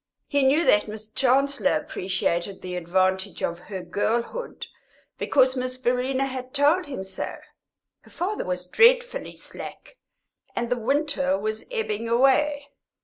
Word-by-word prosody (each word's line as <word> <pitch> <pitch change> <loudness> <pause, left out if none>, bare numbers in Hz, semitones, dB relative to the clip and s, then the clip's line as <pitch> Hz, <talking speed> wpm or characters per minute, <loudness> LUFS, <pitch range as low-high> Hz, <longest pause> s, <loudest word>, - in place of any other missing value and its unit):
He 285 -1 +2
knew 280 +5 +4
that 210 +1 +4
Miss 215 0 -8
Chancellor 275 +3 +2
appreciated 190 - -2
the 180 -1 -5
advantage 185 +2 0
of 170 0 -1
her 190 -3 -5
girlhood, 230 - -2 0.5
because 260 -1 +3
Miss 255 0 -2
Verena 255 +2 0
had 260 0 -6
told 300 +5 +3
him 265 -9 -5
so. 190 0 -4 0.6
Her - - -20
father 385 +5 -2
was 180 0 -3
dreadfully 485 - +3
slack, - - -10 0.6
and 240 0 -2
the 245 - +1
winter 275 -1 +1
was 215 +2 -3
ebbing 230 - -2
away. 280 +4 +3
255 Hz, 135 wpm, -25 LUFS, 205-285 Hz, 0.6 s, knew